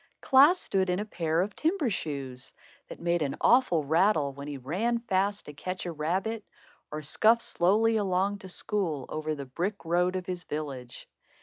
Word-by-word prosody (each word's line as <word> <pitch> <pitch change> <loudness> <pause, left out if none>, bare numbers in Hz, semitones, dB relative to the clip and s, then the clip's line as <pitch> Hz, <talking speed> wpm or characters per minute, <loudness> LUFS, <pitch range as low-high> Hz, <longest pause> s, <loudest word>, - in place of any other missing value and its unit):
Klaas 290 +7 +6
stood 190 -1 0
in 180 - +1
a 210 - -3
pair 165 -5 0
of 205 +2 -3
timber 320 - 0
shoes, 135 -7 -5 0.3
that - - -10
made 170 0 0
an 140 -2 -2
awful 240 - +4
rattle 160 -1 +2
when 140 +1 -8
he 145 -1 -5
ran 185 - -1
fast 205 -3 -1
to 150 - -9
catch 185 +6 -5
a 175 - -3
rabbit, 185 +8 -2 0.5
or 150 0 -6
scuffed 225 +10 +3
slowly 220 +6 +2
along 200 0 0
to 190 - -10
school 175 -8 -1
over 155 0 -3
the 140 -1 -6
brick 175 +9 -4
road 180 +2 +1
of 185 -1 -3
his 180 -1 -4
village. 140 -7 -6
180 Hz, 180 wpm, -28 LUFS, 150-210 Hz, 0.5 s, Klaas